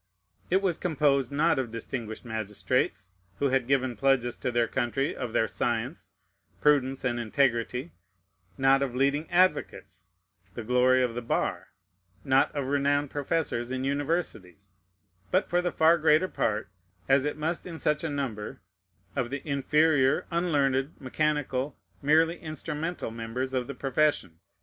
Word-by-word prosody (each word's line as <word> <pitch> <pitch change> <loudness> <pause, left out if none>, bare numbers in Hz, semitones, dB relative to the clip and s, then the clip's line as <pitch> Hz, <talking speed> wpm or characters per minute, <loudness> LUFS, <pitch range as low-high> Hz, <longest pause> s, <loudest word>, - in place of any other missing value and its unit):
It 190 +2 +2
was 180 -4 0
composed, 145 -6 +1
not 150 +1 +2
of 125 -3 -2
distinguished 115 0 -6
magistrates, 105 -4 -2 0.3
who 140 - +1
had 130 -2 +1
given 130 -2 +1
pledges 125 0 +1
to 130 - -2
their 120 -1 +2
country 135 +3 -1
of 120 - -4
their 110 - +2
science, 120 +8 -2 0.5
prudence, 135 -3 +2
and 120 -1 0
integrity, 125 +3 0 0.7
not 135 0 +4
of 130 -3 -2
leading 140 +4 +1
advocates, 130 - 0 0.5
the 120 - -5
glory 125 +2 +3
of 125 -2 -1
the 120 - -4
bar, 115 - -1 0.6
not 135 -1 +3
of 140 -2 -1
renowned 145 0 +1
professors 145 -4 -1
in 130 0 -3
universities, 135 - -3 0.6
but - - +2
for 175 0 +1
the 175 0 -1
far 165 +2 +4
greater 155 +3 +4
part, 110 - -1 0.4
as 135 0 +4
it 150 +1 -2
must 165 +4 -2
in 165 -2 -7
such 150 0 0
a 165 - -1
number, 130 -8 -4 0.6
of 120 - -1
the 140 +3 -6
inferior, 140 0 +2
unlearned, 145 -5 +1
mechanical, 145 -1 -1 0.2
merely 160 +4 +3
instrumental 155 -2 -4
members 115 +3 -4
of 125 -2 -1
the 140 - -6
profession. 135 - 0
135 Hz, 145 wpm, -28 LUFS, 120-150 Hz, 0.7 s, not